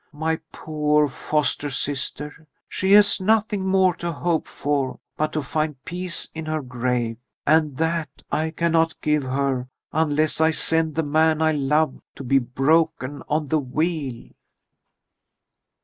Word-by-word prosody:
My 160 +2 -1
poor 150 -1 +1
foster 145 +1 -1
sister, 145 +3 -3 0.2
she 190 +1 +1
has 205 -1 +6
nothing 210 -1 +1
more 190 -1 +4
to 170 0 -3
hope 165 +1 -1
for 140 -3 -2 0.2
but 155 0 -1
to 155 - -1
find 150 -1 -3
peace 180 +2 -3
in 160 -1 -6
her 155 -1 -2
grave, 125 -2 -2 0.3
and 155 -3 +3
that 160 0 0 0.2
I 160 +1 0
cannot 165 0 +1
give 150 -1 +2
her 130 -1 -1 0.2
unless 155 0 +1
I 160 - +5
send 160 0 +1
the 160 - +1
man 155 +1 +2
I 160 0 +3
love 150 0 +1
to 135 - -8
be 135 +2 +3
broken 135 +2 +1
on 150 -1 0
the 155 - +2
wheel." 145 -2 -3
155 Hz, 140 wpm, -23 LUFS, 140-160 Hz, 0.3 s, has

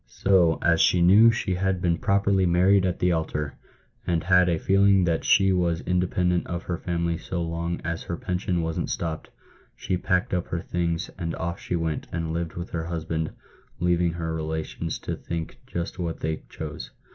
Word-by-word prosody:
So, 90 -4 +3
as 80 -1 +4
she 90 - +4
knew 100 +7 +7
she 110 -5 0
had 95 0 0
been 85 -2 +1
properly 100 -1 +2
married 95 +2 +4
at 90 - -1
the 90 - +2
altar, 80 -3 -2 0.5
and 85 -2 +1
had 90 0 +4
a 85 - +1
feeling 100 +2 +4
that 85 -2 0
she 95 -4 +4
was 85 -2 +1
independent 90 0 0
of 85 -1 -4
her 85 -2 -3
family 85 -1 -1
so 85 0 -3
long 85 +1 -3
as 85 -1 -3
her 85 - -4
pension 90 -1 -1
wasn't 80 0 -2
stopped, 80 -2 -3 0.5
she 90 - -2
packed 90 +1 0
up 90 -1 -1
her 85 - -3
things, 85 -1 -2
and 85 -1 -2
oif 85 0 -4
she - - -3
went, 80 -2 -2
and 80 -1 -3
lived 85 -1 -3
with 85 +1 -6
her 80 -1 -3
husband, 80 -1 -2 0.5
leaving 90 -1 +2
her 80 -1 -3
relations 80 +1 -3
to - - -4
think 85 -1 -6
just 85 +2 -4
what 85 -2 -3
they 80 0 -2
chose." - - -7
85 Hz, 185 wpm, -25 LUFS, 80-90 Hz, 0.5 s, knew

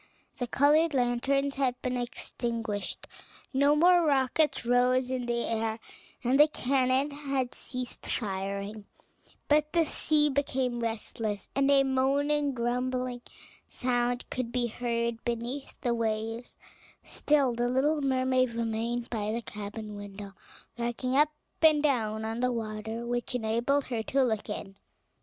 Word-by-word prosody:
The 245 - -1
colored 295 +5 +3
lanterns 270 +3 +1
had 255 -2 0
been 255 0 -1
extinguished, 230 -3 -3 0.5
no 285 +2 +4
more 350 +3 +6
rockets 285 -1 +2
rose 250 +1 +3
in 250 -2 -2
the 235 0 0
air, 225 -1 -1 0.5
and 255 +3 +3
the 300 - +9
cannon 265 0 +1
had 275 -3 -2
ceased 250 -1 -5
firing; 200 0 -3 0.6
but 300 0 +3
the 335 -2 +4
sea 300 -1 +2
became 265 -3 0
restless, 225 -2 -3
and 275 +1 +3
a 275 -1 +6
moaning, 280 +2 +1
grumbling 250 +1 -1 0.5
sound 245 -1 0
could 255 -2 -2
be 245 0 0
heard 235 0 -2
beneath 240 +4 -4
the 240 -2 +1
waves: 225 +1 -2 0.5
still 280 -4 +2
the 240 +1 0
little 290 +4 +2
mermaid 255 -2 +1
remained 230 +1 -2
by 215 -2 -1
the 230 +1 -3
cabin 210 0 -7
window, 205 -1 -8 0.5
rocking 240 +2 -1
up 295 +2 +5 0.3
and 310 -2 +5
down 220 -6 +1
on 225 +1 -3
the 250 0 +2
water, 220 0 -4
which 240 +1 -2
enabled 240 +5 +1
her 235 -4 -3
to 270 +4 +1
look 220 -4 -1
in. 195 - -5
245 Hz, 135 wpm, -29 LUFS, 230-275 Hz, 0.6 s, the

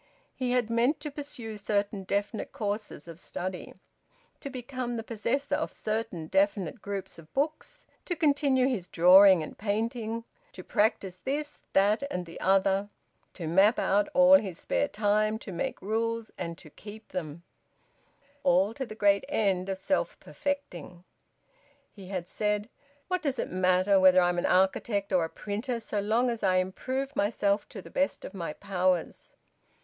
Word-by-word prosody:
He 255 -2 -2
had 240 -3 +1
meant 240 +6 +2
to 300 - -5
pursue 275 -7 -7
certain 205 -1 -1
definite 200 +3 -2
courses 210 -3 -4
of 165 0 -10
study, 185 0 -6 0.6
to 280 - -6
become 255 -2 -4
the 225 - -4
possessor 240 +6 -2
of 300 +2 0
certain 215 -6 -3
definite 225 - 0
groups 200 -4 -6
of 160 -1 -16
books, 310 - -2 0.2
to 350 - -2
continue 280 -5 +3
his 215 -10 -2
drawing 185 0 +7
and - - -8
painting, 225 +2 -2 0.3
to - - -9
practise 200 -4 0
this, 290 +8 -4
that 205 +4 +4
and 180 -6 -3
the 165 - -10
other, 195 +1 +2 0.5
to 170 - -6
map 195 - +4
out 205 -9 +2
all 275 +1 +8
his 190 -5 -6
spare 285 - 0
time, 215 -1 +1
to 220 - -9
make 170 - -3
rules 225 +2 -1
and 170 -2 -5
to 155 - -15
keep 215 +5 -12
them, 165 -2 -5 1.0
all 195 -4 +3
to 265 +1 -5
the 215 - -8
great 200 -2 +3
end 195 -3 +1
of 190 - -2
self 240 +9 -1
perfecting. 180 - -5 0.9
He 195 -3 -12
had 180 -2 -4
said: 210 +2 -1 0.4
"What 365 -1 -1
does 275 -4 -1
it - - -3
matter 185 +2 +3
whether 185 -1 +7
I 175 -1 +4
am 175 0 0
an - - 0
architect 195 +2 +1
or 180 -2 +4
a - - -7
printer, 225 +7 -4
so 220 -2 -3
long 225 +5 +1
as 230 - -5
I 185 -2 +2
improve 260 +9 -2
myself 200 -1 +1
to 195 - -9
the - - -13
best 280 +1 -1
of - - -8
my 170 -5 -4
powers?" 185 -3 -1
205 Hz, 165 wpm, -28 LUFS, 185-245 Hz, 1.0 s, all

